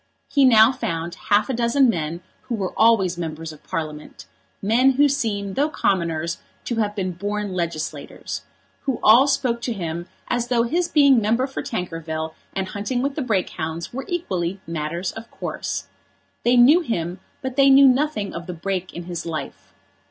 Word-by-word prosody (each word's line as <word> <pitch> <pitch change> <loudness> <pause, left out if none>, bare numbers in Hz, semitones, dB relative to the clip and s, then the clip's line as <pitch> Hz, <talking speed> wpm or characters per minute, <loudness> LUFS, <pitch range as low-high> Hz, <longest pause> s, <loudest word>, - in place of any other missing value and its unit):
He 280 -2 +5
now 225 -1 +7
found 170 -9 -3 0.2
half 210 0 +4
a 265 - -2
dozen 240 +3 +3
men 170 -5 -1 0.3
who 245 - -1
were 195 -4 -3
always 195 -6 +3
members 160 -1 -5
of 155 - -16
Parliament, 150 - -6 0.3
men 245 +6 +3
who 290 +3 +5
seem, 215 -8 -1
though 290 +6 +1
commoners, 170 - -1 0.3
to 235 - -2
have 210 -2 0
been 185 -3 -2
born 205 +2 -3
legislators, 170 -3 -4 0.4
who 265 -4 -1
all 235 +6 +7
spoke 255 -4 0
to 240 - -2
him 170 -3 -4 0.2
as 240 -1 -1
though 240 -2 +2
his 335 +9 0
being 280 -7 +5
member 230 +5 +2
for 270 - -5
Tankerville 165 -5 -4 0.2
and 190 -1 -2
hunting 220 +5 -2
with 280 0 0
the 300 - -3
Brake 215 -8 0
hounds 160 +4 -5
were 270 +2 -4
equally 195 - -2
matters 165 +3 -3
of 225 +1 -10
course. - - -4 0.6
They 245 +1 +3
knew 270 +8 +7
him, 180 - -3 0.2
but 260 -1 -3
they 275 0 +6
knew 275 +1 +8
nothing 255 -6 +1
of 170 +1 -7
the 180 - -4
break 185 +2 -3
in 175 - -5
his 170 -1 -5
life. 155 -4 -6
205 Hz, 175 wpm, -22 LUFS, 170-255 Hz, 0.6 s, knew